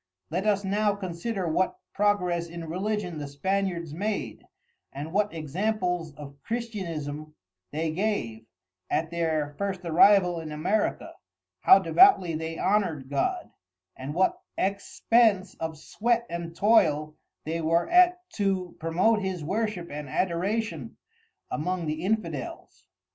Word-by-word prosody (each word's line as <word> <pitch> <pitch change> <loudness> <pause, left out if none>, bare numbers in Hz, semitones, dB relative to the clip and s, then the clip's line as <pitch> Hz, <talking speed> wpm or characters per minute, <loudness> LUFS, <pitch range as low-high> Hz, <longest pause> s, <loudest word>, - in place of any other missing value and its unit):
Let 185 +6 -1
us 200 -1 +2
now 205 +1 +1
consider 190 +1 -3
what 180 +4 0 0.2
progress 180 -4 +1
in 170 -1 -7
Religion 185 -1 -2
the 145 - -5
Spaniards 175 +1 -2
made, 205 +5 -3 0.5
and 145 +4 -7
what 210 +1 +2
examples 175 0 -2
of 140 -1 -11
Christianism 165 - -5 0.4
they 160 +1 -1
gave, 155 - -2 0.4
at 160 +1 0
their 160 -3 -1
first 195 -2 -2
arrival 175 +1 +5
in 160 -2 -7
America, 190 +8 -1 0.5
how 380 - +8
devoutly 360 - +5
they 160 +1 -4
honoured 170 -9 0
God, 355 - -1 0.4
and 135 +3 -6
what 190 +2 +2 0.2
expence 200 0 +2
of 160 -1 -4
sweat 235 +8 0
and 170 -1 -5
toil 155 -8 +3 0.3
they 165 +2 -2
were 165 +2 +2
at 360 +1 +4
to 190 -3 -1
promote 185 +7 +2
his 190 -4 -3
Worship 195 0 -2
and 145 -1 -6
Adoration 190 - -2 0.5
among 175 +3 -2
the 155 +1 -3
Infidels. 180 - -3
180 Hz, 125 wpm, -27 LUFS, 160-205 Hz, 0.5 s, how